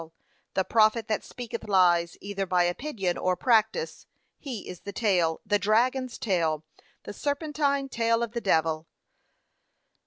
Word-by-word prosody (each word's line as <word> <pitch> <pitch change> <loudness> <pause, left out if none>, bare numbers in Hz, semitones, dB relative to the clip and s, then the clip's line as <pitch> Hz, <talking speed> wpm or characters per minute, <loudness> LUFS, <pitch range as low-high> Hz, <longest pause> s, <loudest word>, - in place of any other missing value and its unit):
The 190 - +2
prophet 220 +1 +3
that 215 - 0
speaketh 235 -2 -7
lies, 175 -3 +3
either 195 -1 -3
by 180 -1 +3
opinion 190 0 -2
or 185 0 +1
practice, 230 - +1 0.3
he 255 -8 -6
is 180 - -8
the 200 - -7
tail, 185 -7 +1
the 205 0 +2
dragons's 245 +5 +1
tail, 160 -6 0 0.4
the - - -7
serpentine 285 0 -1
tail 230 -2 +1
of 235 - -3
the 235 0 -3
devil. 160 -4 +1
210 Hz, 135 wpm, -27 LUFS, 180-240 Hz, 0.4 s, prophet